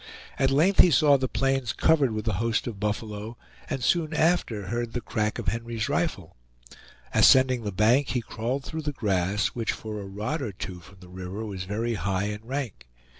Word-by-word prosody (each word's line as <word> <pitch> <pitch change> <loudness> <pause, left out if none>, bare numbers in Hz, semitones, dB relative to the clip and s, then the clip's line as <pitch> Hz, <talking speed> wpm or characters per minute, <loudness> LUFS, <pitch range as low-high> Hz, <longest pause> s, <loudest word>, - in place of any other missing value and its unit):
At 135 - +3
length 160 +9 +3
he - - +9
saw 145 -1 +5
the 130 -1 0
plains 135 -3 0
covered 145 -6 +3
with 110 -1 -4
the 110 - 0
host 115 -1 0
of 110 -5 -5
buffalo, 105 +1 -3 0.3
and 130 - -3
soon 160 +3 +1
after 150 - +1
heard 120 0 -2
the 125 - -1
crack 110 -2 -2
of - - -1
Henry's 115 -1 -3
rifle. 140 - -2 0.8
Ascending 130 -2 +5
the 105 -2 -3
bank, 115 +8 +3
he 125 - -1
crawled 120 +5 -3
through 160 0 -4
the 150 -1 -3
grass, 100 -3 0
which 115 -2 -2
for 105 -1 -6
a - - -7
rod 110 +11 -3
or 115 -7 -4
two 90 0 -6
from 95 +3 -17
the 90 - -13
river 95 +4 -6
was 95 -3 -5
very 115 +4 -2
high 95 -1 -1
and 105 +1 -4
rank. 125 - -4
115 Hz, 195 wpm, -26 LUFS, 105-135 Hz, 0.8 s, he